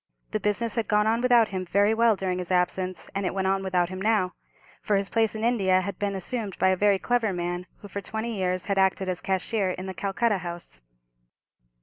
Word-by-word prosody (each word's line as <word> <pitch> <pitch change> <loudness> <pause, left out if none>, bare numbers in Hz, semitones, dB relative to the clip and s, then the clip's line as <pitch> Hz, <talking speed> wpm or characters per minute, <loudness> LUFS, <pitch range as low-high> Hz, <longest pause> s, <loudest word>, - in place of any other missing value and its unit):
The 215 - -1
business 210 +2 0
had 230 -3 -1
gone 210 0 +3
on 225 +2 +2
without 240 -3 +4
him 185 -1 -3
very 200 +4 +2
well 230 -1 +4
during 185 -2 -2
his 180 - -5
absence, 185 0 0
and 195 - -2
it 185 - -2
went 190 -1 0
on 195 0 +1
without 180 -2 0
him 185 0 -6
now, 210 -3 +2 0.5
for 210 - +1
his 195 0 +1
place 225 -1 +2
in 220 - -4
India 195 -6 +3
had 195 -1 -5
been 200 -1 -1
assumed 205 +2 -4
by 190 - +3
a 185 - +3
very 200 +1 +3
clever 235 0 0
man, 175 0 -3
who 205 - -9
for 200 0 -5
twenty 220 +3 -4
years 185 -2 -1
had 200 -1 0
acted 190 0 +2
as 180 -1 -1
cashier 190 +1 0
in 185 +1 -4
the 190 - -5
Calcutta 200 +2 0
house. 170 - -8
195 Hz, 225 wpm, -26 LUFS, 185-215 Hz, 0.5 s, without